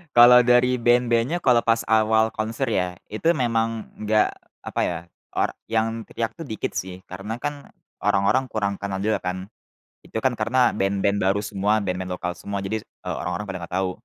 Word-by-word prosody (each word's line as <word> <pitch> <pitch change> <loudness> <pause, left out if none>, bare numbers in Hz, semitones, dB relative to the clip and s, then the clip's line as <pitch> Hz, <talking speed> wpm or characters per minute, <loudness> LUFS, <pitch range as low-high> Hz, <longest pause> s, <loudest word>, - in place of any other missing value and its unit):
Kalau 120 +1 +9
dari 125 +1 +4
band-bandnya 120 +6 +2
kalau 125 -3 +5
pas 115 0 +1
awal 110 0 +4
konser 115 +3 -2
ya, 90 -2 0 0.2
itu 165 +11 +1
memang 115 -3 0 0.2
enggak 105 0 +2 0.3
apa - - -2
ya, 85 -1 -2 0.4
or - - +1 0.2
yang 115 0 -1
teriak 115 -1 -3
tuh 165 -3 -9
dikit 110 -4 -3
sih 95 0 -5
karena 100 +4 -6
kan, 145 +3 -5 0.3
orang-orang 105 +6 +2
kurang 100 -4 -2
kenal 100 -1 -3
juga 110 0 +1
kan. 95 +3 -5 0.5
Itu 110 - -4
kan 125 -3 +1
karena 125 +3 +3
band-band 100 0 0
baru 100 +1 +1
semua, 105 +1 0
band-band 90 -1 -3
lokal 90 -1 -4
semua 100 -1 -4
jadi, 100 +3 -2
eee, - - -7
orang-orang 90 +4 -3
pada 95 - -4
gak 90 - -13
tahu. 95 - 0
110 Hz, 175 wpm, -24 LUFS, 95-120 Hz, 0.5 s, Kalau